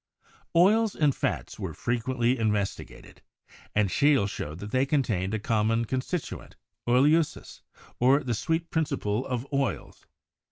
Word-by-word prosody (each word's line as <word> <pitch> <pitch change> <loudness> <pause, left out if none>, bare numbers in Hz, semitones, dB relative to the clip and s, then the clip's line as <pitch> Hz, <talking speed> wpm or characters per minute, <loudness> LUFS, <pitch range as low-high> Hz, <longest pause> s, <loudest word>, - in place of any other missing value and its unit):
Oils 210 +5 +4
and 145 -3 +2
fats - - -3
were - - -5
frequently 120 +1 0
investigated, 105 -3 -3 0.5
and 105 -2 +2
Scheele 140 -6 +3
showed 75 -5 -6
that 105 +3 -8
they 130 +2 +2
contained 110 -9 0
a - - -2
common 115 +1 +1
constituent, 130 +8 -4 0.3
oelsiiss, 150 +5 +2 0.4
or 135 +4 +4
the 120 - -1
"sweet 165 +8 -2
principle 125 -8 -1
of 125 -1 -3
oils." 140 -2 -3
125 Hz, 125 wpm, -27 LUFS, 110-145 Hz, 0.5 s, Oils